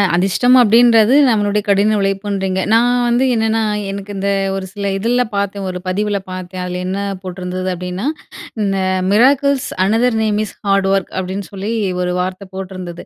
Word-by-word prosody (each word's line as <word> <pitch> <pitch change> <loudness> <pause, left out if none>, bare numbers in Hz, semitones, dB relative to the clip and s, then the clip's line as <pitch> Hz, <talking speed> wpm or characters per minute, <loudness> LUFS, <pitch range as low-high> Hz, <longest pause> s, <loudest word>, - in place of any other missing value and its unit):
அதிஷ்டம் 195 +8 +3
அப்படின்றது, 230 0 +5 0.2
நம்மளுடைய 210 -2 +1
கடின 205 +2 +3
உழைப்புன்றீங்க. 195 -1 -1
நான் 235 +2 +4 0.2
வந்து 240 +2 +2
என்னன்னா, 225 0 +1 0.3
எனக்கு 200 +1 -7
இந்த 195 +1 -1 0.3
ஒரு 195 -1 -4
சில 200 -1 -3
இதுலலாம் 240 +3 0
பாத்தேன், 200 0 -2
ஒரு 180 0 -5
பதிவில 205 +2 -1
பாத்தேன். 185 0 -6
அதில 180 0 -4
என்ன 190 +2 -2 0.2
போட்டிருந்தது 185 0 -4
அப்படின்னா, 180 +4 -5 0.6
இந்த 195 -1 0 0.3
"miracles 275 +4 +3 0.2
another 225 +3 +2
name 210 -1 0
is - - -10
hard 195 -1 +2
work" 195 -2 -1
அப்படின்னு, 190 +2 -4
சொல்லி 200 +3 -4 0.3
ஒரு 180 0 -1
வார்த்தை 185 +2 -4
போட்டுருந்தது. 185 -2 -7
200 Hz, 150 wpm, -17 LUFS, 185-220 Hz, 0.6 s, அப்படின்றது